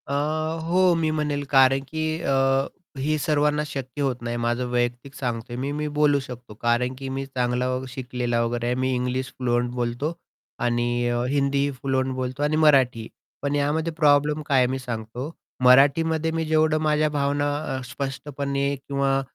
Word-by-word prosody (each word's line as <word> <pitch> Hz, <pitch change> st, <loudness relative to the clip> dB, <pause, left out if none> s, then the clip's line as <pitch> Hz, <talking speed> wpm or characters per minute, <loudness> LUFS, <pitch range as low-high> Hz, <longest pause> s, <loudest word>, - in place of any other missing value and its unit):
अ, 140 Hz, -, -3 dB, 0.5 s
हो 180 Hz, +1 st, +4 dB
मी 160 Hz, -1 st, +1 dB
म्हणेल, 150 Hz, -2 st, -1 dB
कारण 135 Hz, -1 st, +5 dB
की 155 Hz, +1 st, -3 dB, 0.2 s
अ, 135 Hz, 0 st, +2 dB, 0.3 s
ही 150 Hz, +3 st, 0 dB
सर्वांना 150 Hz, 0 st, +1 dB
शक्य 135 Hz, -1 st, -5 dB
होत 130 Hz, -3 st, -1 dB
नाही 120 Hz, 0 st, -3 dB
माझं 120 Hz, +1 st, 0 dB
वैयक्तिक 120 Hz, +2 st, -1 dB
सांगतोय 120 Hz, -2 st, -4 dB
मी, 135 Hz, +3 st, -2 dB
मी 150 Hz, +1 st, -2 dB
बोलू 145 Hz, -1 st, +4 dB
शकतो. 125 Hz, -4 st, -9 dB
कारण 120 Hz, +3 st, 0 dB
की 135 Hz, +1 st, -6 dB
मी 135 Hz, +1 st, -3 dB
चांगला 125 Hz, -2 st, -1 dB, 0.2 s
शिकलेला 125 Hz, -2 st, -2 dB
वगैरे 120 Hz, 0 st, -2 dB
आहे. 120 Hz, +1 st, +1 dB
मी 130 Hz, +1 st, 0 dB
इंग्लिश 125 Hz, +1 st, -2 dB
फ्लुअंट 120 Hz, -1 st, 0 dB
बोलतो 120 Hz, +6 st, -2 dB, 0.5 s
आणि 120 Hz, 0 st, 0 dB
अ, 120 Hz, 0 st, 0 dB
हिंदी 140 Hz, 0 st, +1 dB
फ्लुअंट 130 Hz, 0 st, -1 dB
बोलतो 130 Hz, +2 st, -3 dB
आणि 150 Hz, +1 st, +1 dB
मराठीही, 130 Hz, -6 st, +4 dB, 0.3 s
पण 145 Hz, 0 st, -1 dB
यामध्ये 155 Hz, +3 st, 0 dB
प्रॉब्लेम 150 Hz, -1 st, +3 dB
काय 140 Hz, -3 st, +3 dB
आहे, 125 Hz, -1 st, +5 dB
मी 130 Hz, -, -2 dB
सांगतो. 120 Hz, +3 st, -5 dB, 0.3 s
मराठीमध्ये 155 Hz, +5 st, +5 dB
मी 160 Hz, 0 st, -1 dB
जेवढं 155 Hz, 0 st, +3 dB
माझ्या 155 Hz, 0 st, +2 dB
भावना 145 Hz, 0 st, 0 dB, 0.2 s
अ, -, -, -5 dB
स्पष्टपणे 140 Hz, +2 st, -3 dB
किंवा 135 Hz, 0 st, 0 dB
135 Hz, 160 wpm, -24 LUFS, 125-145 Hz, 0.5 s, कारण